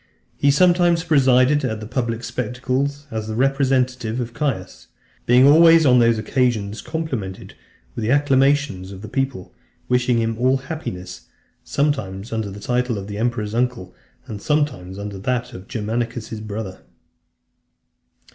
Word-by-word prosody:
He 140 - +2
sometimes 175 +2 +4
presided 135 -2 +4
at 110 -4 -2
the 105 - -7
public 115 0 -3
spectacles, 130 +4 -2
as 110 -1 -4
the 110 - -4
representative 130 -3 +1
of 120 -1 -4
Caius; 130 -11 -3 0.4
being 125 +2 +6
always, 165 +2 +7
on 125 -2 +6
those 115 -1 +4
occasions, 110 -3 -1
complimented 130 - -5 0.4
with - - -5
the 110 - -1
acclamations 135 -7 +2
of 95 +1 -10
the - - -6
people, 135 -4 -3 0.3
wishing 125 -1 +2
him 115 0 -1
all 130 +2 +3
happiness, 90 - -7 0.4
sometimes 115 -8 -2
under 110 -2 -2
the 100 +1 -9
title 125 +1 -1
of 100 - -5
the 105 0 -6
emperor's 115 -3 -1
uncle, 120 -6 -1 0.3
and 110 -6 -7
sometimes 130 -12 -1
under 100 -1 -6
that 125 +4 -2
of 95 +1 -10
Germanicus's 115 0 -3
brother. 105 -3 -6
125 Hz, 140 wpm, -21 LUFS, 110-135 Hz, 0.4 s, always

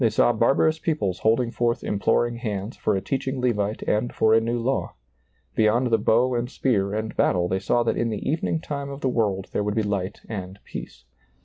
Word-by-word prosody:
saw 115 +2 +3
barbarous 135 +8 +2
peoples 100 - -1
hold 110 +5 +3
ing 120 -2 -1
forth 120 -1 0
imploring 120 +3 +1
hands 105 -2 -4
for 105 - 0
a 95 - -1
teaching 135 +2 -2
Levite 110 -4 0
and 110 +3 0
for 110 - +3
a 115 - +5
new 115 +1 -1
law; 130 +3 -1 0.6
beyond 115 +3 +2
the 115 - +4
bow 120 +4 +3
and 120 0 -1
spear 100 -8 0
and 110 +1 -3
battle 90 -1 +2
they 95 +1 0
saw 120 +4 +1
that 115 - 0
in 115 - 0
the 105 -2 -4
evening 160 +1 0
time 140 -3 -5
of 140 +1 -7
the - - +1
world 100 -6 0
there - - 0
would 105 0 -1
be 110 - +1
light 100 -1 -3
and 95 -3 -6
peace. 60 +1 -9
115 Hz, 210 wpm, -24 LUFS, 105-125 Hz, 0.6 s, a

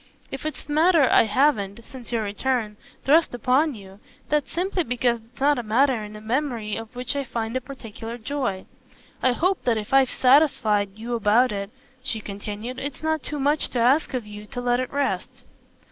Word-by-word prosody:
If 270 +3 -4
it's 310 - -7
a - - -6
matter 315 -2 +5
I - - +6
haven't, 220 -3 +1
since 255 -3 -10
your 230 -2 0
return, 215 +1 -1 0.3
thrust 300 -1 +4
upon 260 +5 +2
you, 195 -1 -13 0.3
that's 300 -1 0
simply 365 +1 0
because 245 -2 0
it's 230 +2 -22
not 285 0 +3
a - - -1
matter 240 +1 +2
in 210 0 -9
the 210 - -9
memory 230 -2 -2
of 225 +1 -8
which 250 +3 -2
I 280 - -1
find 230 -2 -4
a 260 - 0
particular 235 -3 -8
joy. 225 -6 -3 0.6
I 255 - +3
hope 365 +8 0
that 235 -3 +2
if 215 +4 -5
I've 270 -2 +5
satisfied 220 -8 +3
you 235 +2 -5
about 230 +3 +3
it," 200 -1 -4 0.3
she 240 -4 -3
continued, 210 +4 -6
"it's 285 +2 -6
not 315 -1 0
too 295 +2 -5
much 290 +2 +1
to 245 - -2
ask 260 +4 +3
of 245 -4 -3
you 210 0 -10
to 255 +1 -6
let 245 0 +1
it 255 - -3
rest." 280 -1 -2
245 Hz, 195 wpm, -24 LUFS, 220-280 Hz, 0.6 s, I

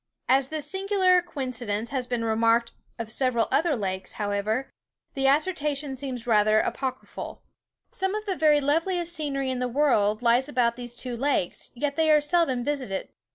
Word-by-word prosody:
As 265 0 +4
this 310 -2 -4
singular 380 +1 +2
coincidence 245 -9 -4
has 260 -3 -2
been 240 -2 -1
remarked 230 +1 +2 0.3
of 225 -1 -5
several 250 -2 +1
other 325 -3 +2
lakes, 190 -4 -4
however, 210 +5 -1 0.5
the 270 -1 +1
assertion 295 -2 0
seems 255 -3 -5
rather 215 -2 +4
apocryphal. 260 +1 -4 0.5
Some 385 +1 -2
of 430 0 -4
the 385 -3 -1
very 305 -3 +4
loveliest 335 +4 0
scenery 275 -5 -2
in 255 - -2
the 250 - 0
world 240 -5 +2
lies 240 +4 +3
about 240 -4 +1
these 240 -1 -7
two 245 -1 -4
lakes, 260 -7 -1
yet 285 +3 -2
they 320 -1 +3
are 305 -1 +7
seldom 295 -5 +1
visited. 255 -9 -3
265 Hz, 160 wpm, -26 LUFS, 235-300 Hz, 0.5 s, are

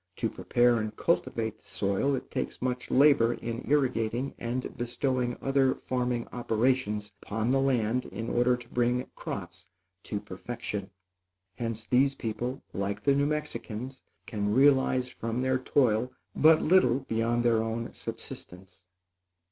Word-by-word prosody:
To - - -1
prepare 120 -1 +3
and 110 0 -4
cultivate 110 -9 0
the - - -27
soil, 100 +8 0
it - - -7
takes - - -3
much 125 0 -2
labor 130 -4 +5
in 115 +1 -5
irrigating 130 -3 +1
and 120 +2 -3
bestowing 120 0 -1
other 135 -1 +3
farming 125 -2 -2
operations 115 -3 0
upon 110 +3 -1
the 135 - +3
land 125 -2 +1
in 115 - -6
order 125 +1 +2
to 120 -1 -13
bring 125 +1 +1
crops 90 -1 -7 0.4
to 105 - -3
perfection. 105 0 -5 0.7
Hence 115 -2 -4
these 135 +4 +3
people, 120 +4 -4
like 100 +2 -3
the 140 - +4
New 140 +1 +2
Mexicans, 135 -4 -4 0.2
can 105 -3 -2
realize 130 0 +4
from 115 0 -3
their 130 0 +1
toil 125 -2 +2 0.2
but 155 +1 +6
little 145 -7 +4
beyond 115 -1 0
their 115 -2 +4
own 115 +1 -3
subsistence. 90 0 -9
120 Hz, 140 wpm, -29 LUFS, 110-130 Hz, 0.7 s, but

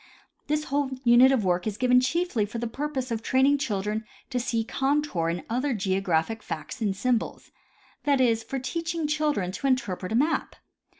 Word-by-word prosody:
This 300 0 0
whole 285 -1 0
unit 245 +2 +7
of 245 -7 +1
work 180 +2 +1
is 210 -1 -3
given 250 +1 +4
chiefly 325 -4 0
for 230 - -6
the 235 - -2
purpose 260 +1 -3
of 225 -1 -1
training 270 +4 +3
children 210 -3 -2 0.3
to 250 - 0
see 235 -2 0
contour 270 - 0
and 170 +1 -3
other 255 +3 0
geographic 190 +1 0
facts 155 +9 -6
in 200 -3 0
symbols 240 +3 -1 0.3
— - - -32
that 285 -2 +3
is, 230 -3 +3
for 270 +4 -5
teaching 330 +5 -3
children 300 -11 0
to 275 - -3
interpret 205 -8 -1
a - - 0
map. 295 +7 +1
250 Hz, 180 wpm, -26 LUFS, 210-280 Hz, 0.3 s, unit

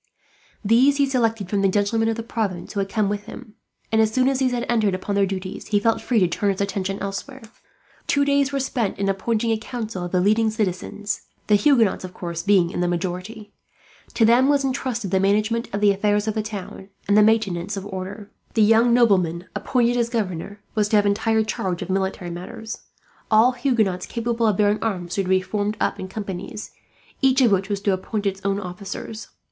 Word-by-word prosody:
These 255 +7 +4
he 280 - +4
selected 225 -6 0
from 200 +1 0
the 195 - +4
gentlemen 205 +3 +1
of 225 - 0
the 230 - -5
province 205 -7 -3
who 200 - -2
had 195 0 -1
come 215 -1 +1
with 205 0 -3
him 230 -4 -10 0.4
and, 220 0 +4
as 220 -1 +2
soon 255 +3 +2
as 270 -1 +1
these 260 -2 +2
had 245 0 -2
entered 215 -5 +2
upon 185 +2 -4
their 200 -1 +2
duties, 190 0 -5
he 205 - +2
felt 225 +2 +1
free 245 - 0
to 180 - +4
turn 200 +4 0
his 190 - -5
attention 195 -1 -2
elsewhere. 200 +7 -6 0.6
Two 285 -1 +2
days 280 -1 +2
were 275 - -1
spent 245 -6 -1
in 195 - -1
appointing 225 +4 0
a 220 - 0
council 220 -5 -5
of 175 - -5
the 185 - +2
leading 215 +4 +3
citizens, 205 -1 -3 0.2
the 210 - +1
Huguenots 225 -2 +3
of 185 -1 -8
course 170 -2 -4
being 185 -3 +3
in - - -4
the 175 - +1
majority. 185 +5 -4 0.6
To 225 - +4
them 245 +4 +5
was 285 -1 +3
intrusted 255 -6 -2
the 190 - +3
management 215 +4 +1
of 200 - -3
the 205 -1 +5
affairs 205 +1 +1
of 215 - 0
the 215 - -1
town, 200 -2 -7 0.2
and 205 - +3
the 210 - +7
maintenance 205 -3 +1
of 195 - -5
order. 200 +1 -7 0.2
The 220 - +5
young 225 +3 +5
nobleman 185 -8 +2
appointed 245 -1 +1
as 235 -1 +1
governor 205 -3 -3
was 210 -2 +1
to 215 - +2
have 205 -1 +4
entire 220 +2 +2
charge 190 -4 -3
of 185 - -5
military 190 -2 -2
matters. 220 +6 -7 0.5
All 220 +3 +5
Huguenots 235 -8 0
capable 235 -1 -1
of 210 -3 +1
bearing 210 0 +2
arms 180 -6 -3
were 195 - +1
to - - -4
be 190 0 +3
formed 205 +2 -2
up - - -1
in 185 - -5
companies, 200 +1 -6 0.5
each 265 0 +4
of 240 -4 +5
which 195 +1 +1
was 200 -1 -2
to 200 -1 +1
appoint 205 +3 -3
its 195 -1 -1
own 200 0 0
officers. 200 +3 -7
210 Hz, 215 wpm, -22 LUFS, 195-230 Hz, 0.6 s, the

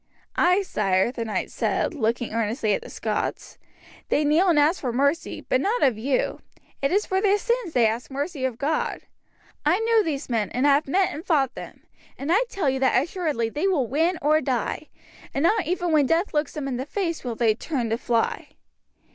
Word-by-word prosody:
"Ay, 365 +3 +3
sire," 195 - +1
the 240 -2 -4
knight 220 -2 -3
said, - - -1
looking 235 -4 -1
earnestly 225 -1 0
at - - -1
the - - -11
Scots, - - -4 0.5
"they 300 - +2
kneel 315 +6 +3
and 330 - +3
ask 300 +5 +3
for 250 - -1
mercy, 280 +7 0
but 255 - 0
not 455 +8 0
of 255 -4 +4
you; 255 +5 -1 0.4
it 275 - +1
is 405 +3 +2
for 380 0 0
their 405 0 +3
sins 470 -5 -1
they 240 -2 +4
ask 225 +3 -1
mercy 285 +1 -4
of 255 -3 -1
God. 300 +5 -1 0.6
I 310 +5 +3
know 455 0 +4
these 310 -8 -3
men, 225 -5 -1
and 255 +3 +1
have 285 +1 +4
met 375 +6 +1
and 310 - -7
fought 290 -8 +1
them, - - -10 0.3
and 280 +4 -3
I 430 +8 +4
tell 380 -10 -2
you 265 0 +1
that 260 -1 +3
assuredly 300 -6 -2
they 300 +10 -1
will 325 -10 +2
win 325 +9 +1
or 305 +2 +4
die, 260 +2 -2 0.5
and 275 - 0
not 420 0 +2
even 350 0 -1
when 300 -3 +4
death 335 +6 +1
looks 295 -1 0
them 295 -3 -4
in 255 -3 -2
the 260 +3 -4
face 335 -1 -2
will 240 -3 -3
they 225 -1 +3
turn 240 -1 -3
to 225 - +1
fly." 230 -1 -1
290 Hz, 205 wpm, -24 LUFS, 245-345 Hz, 0.6 s, of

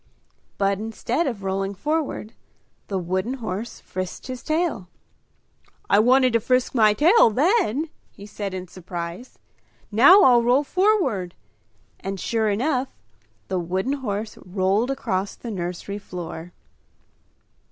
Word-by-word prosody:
But 195 -1 +1
instead 230 +8 -2
of 225 -7 -4
rolling 195 +1 -2
forward, 300 - -2 0.5
the 195 - -2
wooden 185 +7 -2
horse 225 -2 -5
frisked 185 -1 -6
his 255 -1 -6
tail. 310 - -1 1.0
"I 200 - +6
wanted 255 +2 +4
to 230 - +4
frisk 255 +2 +1
my 215 -4 +4
tail 335 - +6
then!" 310 - +1 0.2
he 200 - -12
said 200 -2 -5
in 185 0 -6
surprise. 175 +4 -7 0.5
"Now 285 - +8
I'll 245 -5 +6
roll 250 +4 +3
forward!" 290 - +1 0.6
And 195 0 -5
sure 220 +1 0
enough, 255 +5 -1 0.5
the 185 - -1
wooden 185 +9 -1
horse 215 -6 -4
rolled 190 +5 0
across 200 -7 -2
the 235 - -7
nursery 180 +2 -4
floor. 175 -3 -7
215 Hz, 125 wpm, -23 LUFS, 190-260 Hz, 1.0 s, Now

